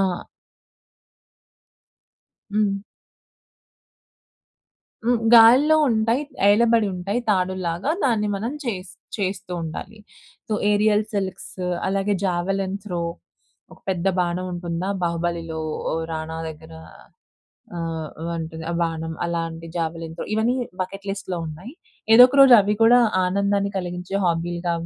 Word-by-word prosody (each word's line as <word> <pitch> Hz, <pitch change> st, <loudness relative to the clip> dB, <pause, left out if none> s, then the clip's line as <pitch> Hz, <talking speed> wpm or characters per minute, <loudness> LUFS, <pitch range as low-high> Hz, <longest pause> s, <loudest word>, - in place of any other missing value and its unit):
ఆ -, -, +4 dB, 2.5 s
హ్మ్. 205 Hz, -1 st, 0 dB, 2.2 s
హ్మ్. 240 Hz, -2 st, +2 dB
గాలిలో 255 Hz, +7 st, +7 dB
ఉంటాయి, 230 Hz, +4 st, +1 dB, 0.3 s
ఏలబడి 225 Hz, +1 st, +4 dB
ఉంటాయి 195 Hz, +6 st, -2 dB
తాడులాగా 185 Hz, -, -1 dB
దాన్ని 220 Hz, -5 st, +1 dB
మనం 225 Hz, +6 st, -3 dB
చేజ్ 185 Hz, -6 st, -4 dB, 0.3 s
చేస్తూ 190 Hz, -3 st, -3 dB
ఉండాలి. 165 Hz, +7 st, -7 dB, 0.5 s
సో, -, -, -4 dB, 0.2 s
ఏరియల్ 210 Hz, +1 st, +3 dB
సిల్క్స్, 195 Hz, -2 st, -4 dB, 0.3 s
అలాగే 195 Hz, +1 st, 0 dB
జావెలిన్ 190 Hz, +2 st, -1 dB
త్రో 180 Hz, -4 st, -3 dB, 0.7 s
ఒక -, -, -16 dB
పెద్ద 185 Hz, -1 st, -1 dB
బాణం 180 Hz, +1 st, 0 dB
ఉంటుందా 175 Hz, +1 st, -3 dB
బాహుబలిలో 170 Hz, -1 st, -2 dB, 0.5 s
రానా 160 Hz, 0 st, -4 dB
దగ్గర. 150 Hz, -, -11 dB, 1.0 s
ఆహ్, 165 Hz, -2 st, -4 dB, 0.2 s
వంటిది 160 Hz, -1 st, -5 dB
ఆ -, -, -2 dB
బాణం, 165 Hz, -1 st, -2 dB
అలాంటి 165 Hz, -1 st, -4 dB
జావెలిన్ 165 Hz, -1 st, -3 dB
త్రో -, -, -4 dB
ఇవన్నీ 225 Hz, +3 st, +1 dB, 0.3 s
బకెట్ 195 Hz, +2 st, -6 dB
లిస్ట్‌లో 190 Hz, -2 st, -4 dB
ఉన్నాయి. 180 Hz, -, -9 dB, 0.4 s
ఏదో 245 Hz, +2 st, +10 dB
ఒక 265 Hz, -, -4 dB
రోజు 270 Hz, -2 st, +8 dB
అవి 210 Hz, +2 st, 0 dB
కూడా 245 Hz, +2 st, +7 dB, 0.3 s
ఆనందాన్ని 200 Hz, +1 st, 0 dB
కలిగించే 180 Hz, +1 st, -4 dB
హాబీలుగా 170 Hz, 0 st, -1 dB
185 Hz, 110 wpm, -23 LUFS, 170-210 Hz, 2.5 s, ఏదో